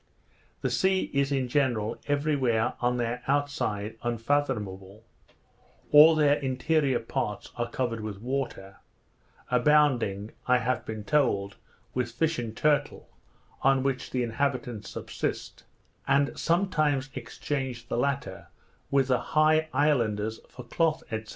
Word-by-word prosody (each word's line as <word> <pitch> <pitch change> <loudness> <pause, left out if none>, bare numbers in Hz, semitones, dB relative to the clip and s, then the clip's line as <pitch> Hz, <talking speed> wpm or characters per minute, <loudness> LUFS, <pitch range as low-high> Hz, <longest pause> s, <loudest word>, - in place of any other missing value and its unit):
The - - -1
sea 190 0 +1
is 140 0 +1
in 135 -2 0
general, 120 -5 0
every 145 +1 +1
where, 120 -3 +1
on 125 0 +1
their 120 +1 -2
outside, 135 -7 -1
unfathomable; 110 -5 -2 0.9
all 155 +2 +9
their 145 -2 +4
interior 135 +1 +1
parts 105 -2 -4
are 120 0 -2
covered 120 -3 -2
with 105 -2 -6
water, 120 -6 -4 0.7
abounding, 125 -6 +2 0.2
I 125 0 +5
have 125 0 -2
been 110 -1 -5
told, 100 -6 +1 0.4
with 125 -1 -1
fish 160 +6 0
and 115 -2 -5
turtle, 150 -1 0 0.5
on 135 -1 +3
which 135 -1 -2
the 125 -1 -1
inhabitants 120 -3 -2
subsist, - - -5 0.4
and 140 +1 +2
sometimes 155 -7 +1
exchange 130 -1 -4
the - - -2
latter 135 -6 -2 0.4
with 135 -1 +2
the 125 - +3 0.2
high 155 +1 +4
islanders 110 -7 +1
for 125 - -10
cloth, 160 +6 0
&c. 110 0 -3
130 Hz, 125 wpm, -27 LUFS, 115-145 Hz, 0.9 s, all